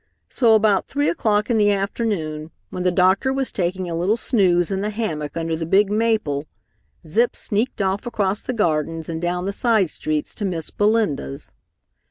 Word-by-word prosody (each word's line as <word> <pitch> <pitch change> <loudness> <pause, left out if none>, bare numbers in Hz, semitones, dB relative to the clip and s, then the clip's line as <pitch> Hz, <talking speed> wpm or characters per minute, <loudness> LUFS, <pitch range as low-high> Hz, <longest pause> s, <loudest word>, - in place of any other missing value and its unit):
So 230 -4 +5
about 210 -3 +2
three 285 +1 0
o'clock 215 -7 0
in 225 - +2
the 205 -1 +4
afternoon 195 -7 -2 0.2
when 180 - -4
the 180 - +2
doctor 185 +8 +3
was 270 -1 -1
taking 185 0 -2
a 170 - -4
little 180 +7 +1
snooze 185 -8 +2
in 195 0 -1
the 210 - -1
hammock 165 -9 -4
under 165 0 -1
the 160 0 -4
big 200 +3 +3
maple, 210 -10 0 0.6
Zip 225 +10 +1
sneaked 215 0 -1
off 195 +4 -1
across 205 -3 0
the - - -4
gardens 165 -7 -1
and 160 -1 -4
down 180 +1 -1
the 200 - -1
side 210 -4 +2
streets 155 -1 -3
to - - -6
Miss 170 -4 -3
Belinda's. 205 -10 -1
195 Hz, 180 wpm, -21 LUFS, 165-220 Hz, 0.6 s, So